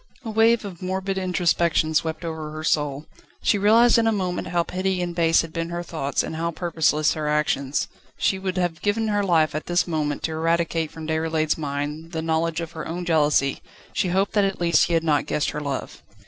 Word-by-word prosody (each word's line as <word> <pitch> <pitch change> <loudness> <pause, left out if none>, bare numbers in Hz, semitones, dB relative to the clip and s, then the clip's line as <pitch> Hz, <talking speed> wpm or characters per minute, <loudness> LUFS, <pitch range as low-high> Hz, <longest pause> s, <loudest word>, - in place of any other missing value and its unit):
A 225 - -3
wave 225 +1 +3
of 185 -4 -8
morbid 190 +1 -2
introspection 170 -3 +1
swept 160 +2 -1
over 160 -2 -4
her 155 +1 -7
soul. 145 -2 0 0.4
She 205 - +3
realised 230 +4 +5
in 225 - +2
a - - +4
moment 185 -4 -2
how 175 -1 +1
petty 185 +1 -2
and 175 -1 -2
base 165 -1 +3
had 165 -1 -9
been 165 0 -3
her 175 0 -4
thoughts 145 -5 -2
and - - -5
how 165 +1 -1
purposeless 155 -2 +1
her 155 -1 -3
actions. 150 -2 0 0.3
She 190 - +1
would 190 -1 -3
have 175 -3 -1
given 220 +2 0
her 205 -1 +1
life 165 -5 +2
at 155 - -4
this 175 0 +2
moment 150 -3 -2
to 160 - -1
eradicate 165 0 0
from 160 0 -9
Déroulède's 160 0 0
mind 150 +2 -4
the 160 -1 -2
knowledge 165 +1 0
of 165 0 -6
her 160 - -6
own 175 +2 -4
jealousy; 150 -4 +2 0.3
she - - 0
hoped 190 +3 +1
that 205 - +3
at 195 -1 -1
least 170 -3 +3
he 170 - -2
had 165 - +1
not 150 -3 +1
guessed 150 - 0
her 150 - -4
love. 140 -2 -5
165 Hz, 215 wpm, -24 LUFS, 155-185 Hz, 0.4 s, realised